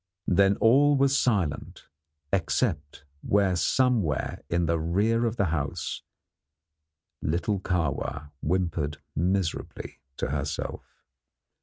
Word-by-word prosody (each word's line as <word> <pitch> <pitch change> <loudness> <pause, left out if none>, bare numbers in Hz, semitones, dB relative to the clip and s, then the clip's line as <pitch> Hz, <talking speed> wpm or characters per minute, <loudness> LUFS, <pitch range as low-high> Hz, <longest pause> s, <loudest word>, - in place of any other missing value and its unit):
Then 100 +2 +4
all 140 +7 +5
was 140 0 +3
silent 100 - -1 0.5
except 80 - -1 0.2
where 100 -2 +2
somewhere 100 - +1
in 85 0 +1
the 85 0 +1
rear 105 +9 +1
of 115 - -2
the 100 - +1
house, 75 -3 -3 1.2
little 90 +6 0
Kahwa 80 -6 -2
whimpered 80 -3 -1 0.2
miserably 90 0 -2 0.2
to - - -2
herself. - - -5
90 Hz, 100 wpm, -27 LUFS, 80-110 Hz, 1.2 s, all